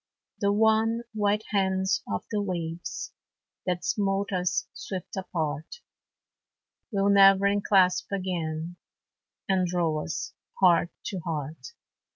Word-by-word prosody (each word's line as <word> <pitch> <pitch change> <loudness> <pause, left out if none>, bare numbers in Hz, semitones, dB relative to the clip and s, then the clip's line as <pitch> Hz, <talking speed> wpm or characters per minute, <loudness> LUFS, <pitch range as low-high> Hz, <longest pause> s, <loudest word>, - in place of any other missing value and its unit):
The 200 0 +2
wan, 220 +2 +3
white 210 0 +1
hands 190 -1 +1
of 100 - -2
the 210 - 0
waves 170 -3 -4 0.5
That 180 -1 -1
smote 200 -1 0
us 180 -2 0
swift 185 -3 -6
apart, 160 - -4 1.1
Will 200 -1 +2
never 195 0 +7
enclasp 200 -2 +3
again, 175 -3 -3 0.7
And 190 -2 +2
draw 165 -3 0
us 170 - -4 0.3
heart 175 -2 +5 0.2
to 190 - -3
heart. 160 - -5
190 Hz, 110 wpm, -27 LUFS, 170-200 Hz, 1.1 s, never